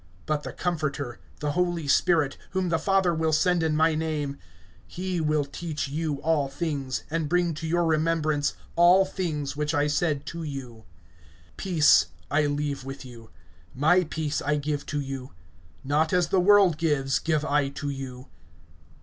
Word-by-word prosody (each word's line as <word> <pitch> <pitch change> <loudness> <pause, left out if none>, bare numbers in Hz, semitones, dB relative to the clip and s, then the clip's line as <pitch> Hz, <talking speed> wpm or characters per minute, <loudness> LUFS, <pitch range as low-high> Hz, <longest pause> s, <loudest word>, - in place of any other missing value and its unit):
(26)But 155 -1 -1
the - - -6
Comforter, 145 -8 -3 0.2
the 150 -1 0
Holy 175 -1 -1
Spirit, 155 -2 +3 0.2
whom 185 -2 0
the 165 -1 +1
Father 195 -3 +2
will 160 -1 0
send 175 +3 +2
in 160 -1 +1
my 160 +1 +3
name, 155 -3 -2 0.5
he 180 - -3
will 150 -2 +1
teach 150 0 -4
you 155 +1 -2
all 155 -3 +2
things, 140 -3 -3
and 160 -2 -1
bring 175 -1 +2
to 160 +2 -5
your 170 +1 +1
remembrance 155 -2 +1 0.2
all 175 +3 +6
things 155 -7 -3
which 150 +2 -1
I 145 0 +2
said 150 -1 0
to 165 +4 -6
you. 130 -7 -7 0.7
(27)Peace 165 -6 +5 0.3
I 150 0 +3
leave 145 -1 -2
with 135 +1 -8
you, 115 -3 -12 0.5
my 160 +7 +4
peace 155 -2 -3
I 150 +1 +1
give 145 0 -3
to 145 - -2
you; 135 -2 -6 0.5
not 150 +4 +1
as 180 -1 +2
the 190 - +3
world 195 -4 +5
gives, 140 -5 +1
give 155 -2 0
I 145 -2 +1
to 140 +1 -4
you. 130 -1 -7
155 Hz, 165 wpm, -26 LUFS, 145-170 Hz, 0.7 s, all